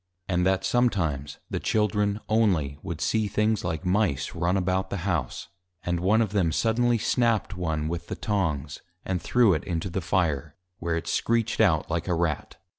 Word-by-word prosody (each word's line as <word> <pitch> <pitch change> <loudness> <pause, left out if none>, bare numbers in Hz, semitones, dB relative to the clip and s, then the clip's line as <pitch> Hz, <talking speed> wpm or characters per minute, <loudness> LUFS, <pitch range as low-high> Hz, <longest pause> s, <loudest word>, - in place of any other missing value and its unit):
And 90 -1 +1
that 95 0 +1
sometimes, 85 - 0
the - - -1
Children 105 -1 +1
(only) 90 -11 +1
would 85 -4 -5
see 110 +3 +1
things 105 +1 +1
like 80 +3 -3
Mice, 90 -7 +1
run 85 +3 +1
about 95 0 0
the 95 -2 -4
House; 85 -10 -2 0.3
and 85 -1 -1
one 105 +6 +3
of 105 - -4
them 95 -6 +2
suddenly 120 +5 +2
snap'd 115 -2 +1
one 80 -5 -2
with 85 +1 -4
the - - -4
Tongs, 75 -9 -2 0.2
and 90 -2 -1
threw 120 +1 +4
it 80 - -1
into 85 +1 -3
the 95 - -2
Fire, 85 -6 0 0.2
where 85 0 -1
it 85 - -4
screeched 115 -1 +1
out 85 -7 +2
like 85 +1 -1
a 90 - +1
Rat. 85 -1 -2
95 Hz, 180 wpm, -26 LUFS, 85-105 Hz, 0.3 s, threw